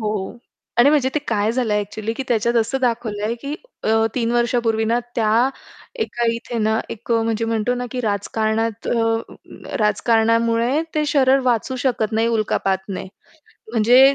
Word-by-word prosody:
हो 210 +1 -3 0.4
आणि 245 - +7
म्हणजे 290 -4 +3
ते - - +3
काय 210 -1 +1
झालंय 230 -4 +1
ॲक्चुअली, 215 +2 -4
की 250 - -4
त्याच्यात 235 0 +1
असं 235 +4 +1
दाखवलंय, 230 -3 -1
की 280 +5 -5 0.3
अ, - - 0 0.3
3 235 -2 0
वर्षापूर्वी 235 -2 +1
ना 230 +2 +2 0.2
त्या 225 +2 +3 0.5
एका 240 - -2
इथे 235 0 -5
ना 220 0 +1
एक 230 +2 -4
अ, 230 - +3
म्हणजे 225 0 -1
म्हणतो 225 +1 0
ना, 245 0 -3
की 255 - -3
राजकारणात 220 +1 -1
अ 225 -1 -3
राजकारणामुळे 230 +5 +2
ते 305 -1 +1
शरीर 270 -2 +4
वाचू 245 +2 0
शकत 230 -4 0
नाही 225 +1 +2
उल्कापातने. 195 -4 -1 0.7
म्हणजे 250 +5 +6
230 Hz, 155 wpm, -21 LUFS, 220-245 Hz, 0.7 s, आणि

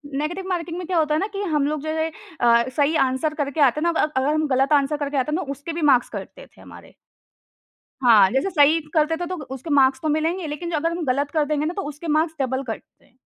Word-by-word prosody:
Negative 345 +6 -3
marking 345 -1 -3
में 360 - -5
क्या 365 - 0
होता 310 -2 +2
है 305 - +2
ना 395 - -1
कि 395 - -3
हम 290 -2 +2
लोग 305 -1 -2
जो 310 - -4 0.5
अ, 235 +1 +4
सही 295 +2 +2
आंसर 260 +4 -1
करके 290 0 -3
आते 275 +1 +4
हैं 340 - +2
ना 330 - -2
अ, - - +4
अगर 270 +3 +1
हम 310 0 0
गलत 270 +2 +2
आंसर 285 +1 +2
करके 285 -1 -3
आते 265 +3 0
हैं 365 - -2
तो 275 - -5
उसके 285 +4 -6
भी 335 - -4
मार्क्स 250 -2 +2
कटते - - -8
थे - - -21
हमारे। - - -14 1.1
हाँ, 210 -6 +6
जैसे 270 +9 0
सही 310 -1 +4
करते 315 0 +2
थे 350 - -3
तो 365 - -4 0.2
उसके 270 +5 -8
मार्क्स 265 -1 +4
तो 310 - -1
मिलेंगे 320 +3 -1
लेकिन 340 +4 -5
अगर 325 +1 0
हम 340 0 -3
गलत 280 +3 0
कर 310 -2 +1
देंगे 300 0 -1
ना 340 - -2
तो 395 - -3
उसके 300 +3 -9
मार्क्स 315 +1 +1
डबल 260 0 -1
कटते। 225 -4 -9
300 Hz, 250 wpm, -22 LUFS, 275-330 Hz, 1.1 s, हाँ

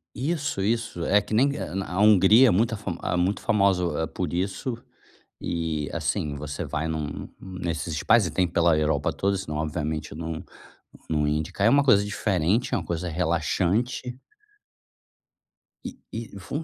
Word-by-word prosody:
Isso, 145 - -2
isso. 110 -4 -1
É 105 +1 +4
que 105 - -7
nem 140 +6 +3
eh, - - -5
na 95 0 -2
a 90 - -1
Hungria 105 +4 +7
é - - +5
muita 115 +5 +2
afam 100 -5 -5
ah, - - -1
muito 90 +3 0
famosa, 100 -5 +2 0.2
eh, - - -1
por 90 -4 -4
isso 100 +7 -2 0.7
e, 80 -3 -2
assim, 75 -2 -2
você 70 0 -5
vai 80 0 -3
num 75 -3 -4
num 95 -1 -9
nesses 85 -2 -3
spas 110 +3 +4
e - - -5
tem 90 -1 +1
pela 85 -1 +3
Europa 75 -2 +1
toda, 100 +1 0
senão, 85 -6 -4
obviamente, 80 0 -3
não 80 +1 -5 0.7
não 75 -2 +1
ia 75 +1 +1
indicar. 80 +6 -2
É - - +7
uma 140 +3 +5
coisa 100 -7 +5
diferente, 105 +1 0
é - - +3
uma - - -4
coisa 85 +1 -3
relaxante. 90 +9 -1 1.7
E - - -7 0.2
e 115 -3 -6
fun 145 - -4
90 Hz, 175 wpm, -25 LUFS, 80-110 Hz, 1.7 s, Hungria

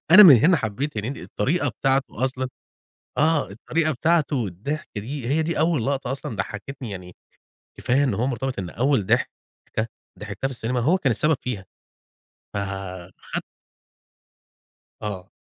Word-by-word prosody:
أنا 190 +5 +12
من 160 -10 +11
هنا 165 +9 +5
حبَّيت 130 +2 -2
هنيدي، 120 +7 -4
الطريقة 145 +12 0
بتاعته 135 -3 0
أصلًا 130 0 -1 0.7
آه، 155 -5 +3
الطريقة 155 +10 0
بتاعته 150 -3 +2
الضحك 115 - -4
دي، 120 +4 -4
هي 155 +4 +2
دي 165 +2 -1
أول 155 -6 +2
لقطة 135 -2 -1
أصلًا 135 -3 -5
ضحَّكتني، 110 +6 -5
يعني 90 -2 -8 0.6
كفاية 135 +3 +2
إن 135 - +1
هو 125 - 0
مرتبِط 130 -2 -2
إن 90 -2 -4
أول 130 0 +1
ضحكة - - +2 0.9
ضحَكتها 105 +5 -3
في 135 - -5
السينما 125 +1 -1
هو 155 +10 +3
كان 140 -8 +1
السبب 150 +7 +2
فيها، 105 -7 -3 0.9
فاخد 95 -2 -5 1.6
آه. 95 -3 -5
130 Hz, 140 wpm, -24 LUFS, 105-145 Hz, 1.6 s, أنا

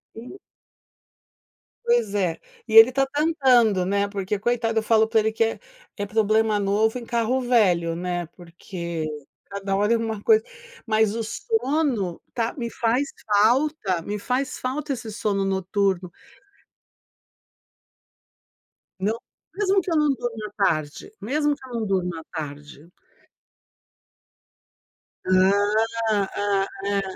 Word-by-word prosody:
E 240 +11 -10 1.5
Pois 235 -4 +1
é. 180 -5 0 0.3
E 220 - -5
ele 225 +2 +10
está 270 +1 +1
tentando, 265 - +3
né, 200 +2 +1
porque, 200 0 -3
coitado, 230 0 0
eu - - -5
falo 220 0 +4
pra 225 0 +3
ele 220 0 +1
que 225 - +2
é 225 - -2 0.4
é 205 - -2
problema 215 +1 +2
novo 210 +4 +1
em 240 - -8
carro 235 +3 0
velho, 190 -9 +2
né, 175 0 -3
porque 170 -1 -7 0.4
cada 195 0 -3
hora 205 +3 +2
é - - +3
uma 220 -2 -3
coisa. 440 0 +5 0.4
Mas 215 -1 +2
o 230 - -2
sono 270 - -1
tá 230 -1 -1
me 235 -3 -3
faz 240 +4 +1 0.2
falta 215 - +2
me 205 +5 -4
faz 255 +6 -2
falta 275 +3 -3
esse 230 -3 -7
sono 205 -2 -1
noturno. 190 -1 0 2.9
Não. 210 +4 0 0.4
Mesmo 390 -1 +2
que 355 - -5
eu 330 - +2
não 300 -1 +3
durmo 240 -4 -4
à - - -14
tarde, 155 -2 -2
mesmo 290 +7 0
que 265 -2 -14
eu - - -10
não 225 -2 -1
durmo 185 -3 0
à 160 - -8
tarde. 150 +1 -9 2.4
Hã, 185 +1 +4 0.6
hã, 200 -2 +1 0.6
hã, 200 0 +1
220 Hz, 135 wpm, -24 LUFS, 195-245 Hz, 2.9 s, ele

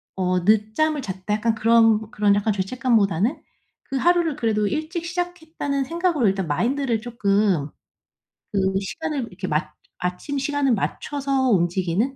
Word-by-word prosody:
어 185 -1 +1
'늦잠을 220 +9 +2
잤다.' 190 +1 -3
약간 225 +2 +1
그런 225 -1 +4
그런 205 -1 +3
약간 205 +2 +1
죄책감보다는 210 - +1 0.4
그 270 - -6
하루를 340 0 +2
그래도 215 -5 +1
일찍 315 - -3
시작했다는 335 -5 -3
생각으로 335 - +1
일단 190 -2 0
마인드를 235 - 0
쪼끔 200 -9 +1 0.8
그 195 -2 +1
시간을 290 - -3
이렇게 185 0 -6
맞 150 -1 -1 0.3
아침 180 +11 -3
시간을 285 -2 +1
맞춰서 270 +3 -1
움직이는 185 +6 +1
225 Hz, 325 characters per minute, -23 LUFS, 195-285 Hz, 0.8 s, 그런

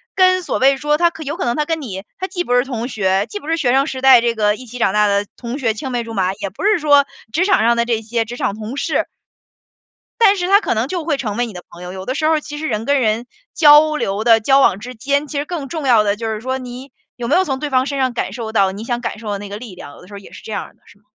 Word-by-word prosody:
跟 370 -1 +4
所 - - -2
谓 270 +1 +4
说， 295 +2 +1
他 345 0 +4
可 320 -1 -9
有 295 +3 -4
可 365 - -3
能 240 0 0
他 300 - 0
跟 325 0 -2
你， 195 -8 -6 0.2
他 375 - -2
既 355 -1 -3
不 245 - -2
是 245 - +4
同 245 -3 -4
学， 195 -4 0
既 410 - -6
不 310 - -13
是 330 - +1
学 255 -6 +1
生 275 +2 +3
时 260 -3 -5
代 260 -2 +7
这 235 -1 0
个 210 -1 +2
一 255 - -11
起 245 +2 -9
长 225 -5 +1
大 210 0 +3
的 200 0 +1
同 240 +2 -6
学、 230 -6 0
青 260 +4 -6
梅 240 -1 -1
竹 230 0 -8
马， 190 -3 0
也 200 -1 -5
不 195 - -9
是 425 +1 +4
说 290 -3 +4 0.3
职 340 - +2
场 390 - +3
上 235 +1 +4
的 235 0 +1
这 230 -2 -1
些 230 +1 -1
职 240 +2 -8
场 - - -1
同 220 +5 -7
事。 - - -1 1.2
但 405 -1 +6
是 355 0 -1
他 400 +2 +5
可 395 - -1
能 225 +4 0
就 350 0 -3
会 305 -3 0
成 215 -6 -3
为 240 0 0
你 - - -8
的 180 -1 -9
朋 170 - -14
友， 180 0 -7
有 190 0 -7
的 255 - -2
时 310 +3 0
候 315 -1 +3
其 295 0 -8
实 315 - -3
人 220 -3 -2
跟 285 -1 +2
人 225 +1 0 0.3
交 305 0 +6
流 205 -6 -2
的 230 -1 +5
交 270 +5 +4
往 195 -7 +3
之 245 +4 -8
间， 280 +5 -1
其 290 - -5
实 290 - -3
更 310 -4 -5
重 310 -2 -4
要 230 -4 +5
的 200 -1 +1
就 225 +1 -5
是 220 -1 -3
说， 260 +3 -3
你 255 +2 -9 0.2
有 240 -1 -5
没 295 - +2
有 375 - +4
从 270 -7 -2
对 295 -1 -4
方 260 +1 +2
身 280 - -3
上 260 -2 0
感 235 - -3
受 230 -3 -6
到 195 -3 +2
你 200 +3 -7
想 240 0 -3
感 235 - -4
受 215 -1 -6
的 200 - -3
那 205 0 -8
个 205 - -6
力 220 -4 -10
量， 145 -5 -11
有 - - -15
的 180 - -15
时 205 - -14
候 200 - -7
也 200 - -15
是 - - -12
这 - - -8
样 - - -4
的， - - -39
是 205 - -20
吗？ 205 - -38
245 Hz, 345 characters per minute, -18 LUFS, 215-295 Hz, 1.2 s, 代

